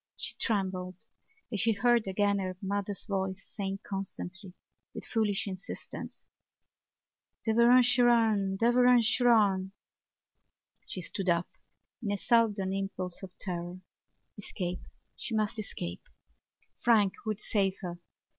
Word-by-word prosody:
She - - -3
trembled 185 -4 -1 0.6
as 210 - -1
she 225 +2 +3
heard 240 0 +3
again 200 +1 +2
her 185 -1 -3
mother's 200 0 -3
voice 190 -2 -2
saying 195 -1 -4
constantly 190 -1 -6 0.4
with - - -6
foolish 215 -3 0
insistence: 190 -1 -7 1.2
"Derevaun 235 +3 +6
Seraun! 230 -5 +3
Derevaun 245 +2 +5
Seraun!" 215 -5 +3 1.1
She 185 - -5
stood 190 +2 -3
up 170 0 +1 0.5
in 215 - -3
a 205 - 0
sudden 205 -4 +2
impulse 190 -2 -4
of 190 -2 -10
terror. 175 -1 -4 0.6
Escape! 180 -3 -4 0.3
She 235 -2 -4
must 215 +1 0
escape! 90 - -5 0.8
Frank 215 -5 +4
would 215 -1 -1
save 195 -3 0
her. 175 -2 -5
200 Hz, 115 wpm, -30 LUFS, 190-225 Hz, 1.2 s, Derevaun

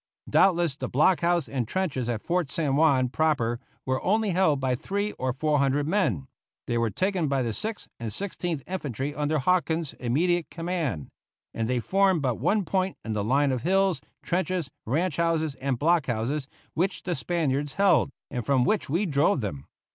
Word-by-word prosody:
Doubtless 175 -6 +3
the 130 -3 -4
block 155 +7 +4
house 170 -2 +2
and 125 -5 -2
trenches 135 -8 -1
at 115 -3 -2
Fort 175 -4 0
San 145 -4 0
Juan 140 -4 +4
proper 125 -4 +1 0.3
were 130 0 0
only 215 +1 +1
held 170 -6 +3
by 130 -1 0
three 200 +10 -2
or 130 0 0
four 150 +3 +1
hundred 140 +1 +1
men; 150 - +1 0.4
they 120 - -2
were 115 -1 +1
taken 185 - 0
by 135 -2 +1
the 115 -2 -2
Sixth 220 - -4
and 115 -2 -4
Sixteenth 175 - -3
Infantry 145 - -3
under 150 +1 0
Hawkins's 165 0 +1
immediate 165 +8 +1
command; 165 - -3 0.4
and 115 0 -2
they 125 -1 +1
formed 190 - +2
but 125 -4 0
one 195 - +1
point 185 +3 -1
in 110 - -2
the 105 -1 -1
line 135 +5 +2
of 130 -2 -1
hills, 190 -3 +2 0.2
trenches, 180 -3 -1 0.2
ranch 155 +5 0
houses, 165 -3 +1
and 135 -2 0
block 165 +2 +2
houses 130 +4 -1 0.3
which 185 +4 -1
the 180 - -1
Spaniards 145 -5 -1
held, 200 -6 +4 0.2
and 125 -2 -3
from 130 +2 +2
which 200 +2 0
we 170 +8 +1
drove 145 0 +2
them. 75 -11 -5
150 Hz, 180 wpm, -26 LUFS, 130-180 Hz, 0.4 s, block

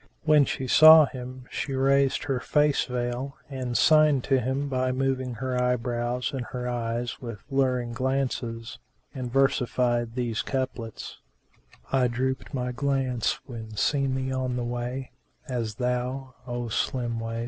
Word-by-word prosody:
When 150 -2 +5
she 130 - -3
saw 155 +4 +9
him 130 -1 -8
she 135 - -3
raised 135 0 +2
her 135 -3 -1
face 150 +1 +2
veil 125 +2 -3
and 125 -3 -2
signed 155 -4 +5
to 135 -1 +2
him 130 +3 -1
by 130 -1 0
moving 130 -1 -1
her 130 0 -2
eyebrows 125 0 -1
and 130 -2 -2
her 125 -1 -4
eyes 120 0 -3
with 115 -5 -7
luring 130 -3 +1
glances, 125 -2 -2 0.3
and 125 -3 -5
versified 125 -3 +1
these 120 -3 -1
couplets, 130 -4 -4 0.7
"I 130 -2 +3
drooped 130 +2 -2
my 125 -2 -2
glance 130 -2 0
when 110 -4 -8
seen 140 0 +1
thee 130 0 -2
on 130 -1 -1
the 125 - -2
way 120 +2 -4 0.2
* - - -44
As 115 -5 -3
though, 125 +2 -2
O 120 -1 -3
slim 120 0 -1
waist! 115 0 -4
125 Hz, 150 wpm, -26 LUFS, 120-135 Hz, 0.7 s, saw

